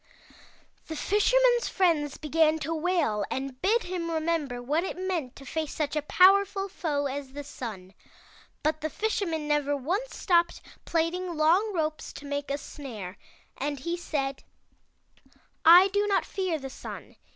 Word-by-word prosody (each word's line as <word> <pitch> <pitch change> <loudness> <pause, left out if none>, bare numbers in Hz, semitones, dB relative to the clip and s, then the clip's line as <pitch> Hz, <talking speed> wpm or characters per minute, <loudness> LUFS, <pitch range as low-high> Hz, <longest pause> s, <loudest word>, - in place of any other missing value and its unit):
"The 320 - -5
Fisherman's 485 +7 +3
friends 320 -7 +1
began 310 +1 +2
to 325 - -2
wail, 320 - +1
and 265 -1 -4
bid 445 +5 +3
him 355 -2 -3
remember 315 -6 -1
what 295 +7 0
it 375 - -4
meant 360 -9 -3
to 275 - -12
face 315 +1 -3
such 300 -1 -2
a 300 - +1
powerful 390 +5 +4
foe 300 -6 -2
as 275 -1 -4
the 290 +1 -6
Sun. 200 -9 -8 0.7
But 310 +1 0
the 310 - -1
Fisherman 335 -5 -1
never 290 -1 +1
once 370 - -2
stopped 345 -2 +2 0.2
plaiting 340 +2 -1
long 350 +8 +3
ropes 310 -4 -2
to 285 - -10
make 285 0 -3
206 280 +1 -5
THROUGH 290 - -9
FAIRY 250 -4 -6
HALLS 185 -4 -6
a - - -16
snare, - - -25 0.5
and 285 -2 -3
he 340 +6 -2
said; 275 -6 -3 1.2
*I 355 +4 +9
do 410 +1 +1
not 400 - +2
fear 370 -4 -2
the 270 -2 -7
Sun. - - -9
315 Hz, 165 wpm, -28 LUFS, 285-365 Hz, 1.2 s, I